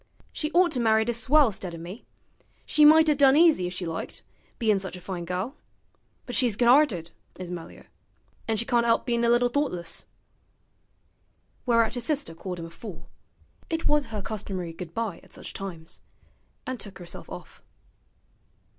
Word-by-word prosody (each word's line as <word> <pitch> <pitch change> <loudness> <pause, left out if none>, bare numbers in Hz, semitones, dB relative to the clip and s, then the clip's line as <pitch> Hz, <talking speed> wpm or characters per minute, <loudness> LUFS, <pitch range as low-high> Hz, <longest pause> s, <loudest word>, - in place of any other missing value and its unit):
She 305 - -2
ought 355 0 +5
to 260 - -1
married 220 0 +3
a - - +2
swell 260 +2 +4
'stead 185 -3 -6
o' - - -7
me; 175 +7 -9 0.6
she 300 - +5
might 315 +1 +8
'a' 300 - +5
done 275 -1 +5
easy 315 - +5
if 180 - -5
she 180 - -4
liked, 165 0 -5 0.3
bein' 215 -4 +2
sich 190 -1 -6
a - - -8
fine 180 -1 -5
gal; 185 - -3 0.7
but 245 - -6
she's 240 -5 +2
good 240 +2 +2
'arted, 235 - +4 0.3
is 180 -1 -7
Melier; 170 -2 -8 0.6
an' 225 -1 0
she 235 - 0
can't 240 -1 +2
'elp 230 -1 +2
bein' 235 -1 0
a 235 +1 +5
bit 245 0 0
thoughtless.' 180 - -2 1.6
Whereat 230 -2 +3
his 245 -2 -3
sister 290 - -1
called 180 +2 -6
him 165 - -6
a 165 - -10
fool 195 +2 -10 0.6
(it 325 0 -1
was 295 -3 +2
her 215 -3 -5
customary 190 -4 -4
goodbye 180 +3 -4
at - - -19
such - - -9
times), 170 -4 -7 0.6
and 255 -2 -4
took 200 -2 -7
herself 175 -2 -9
off. - - -10
225 Hz, 175 wpm, -26 LUFS, 180-255 Hz, 1.6 s, might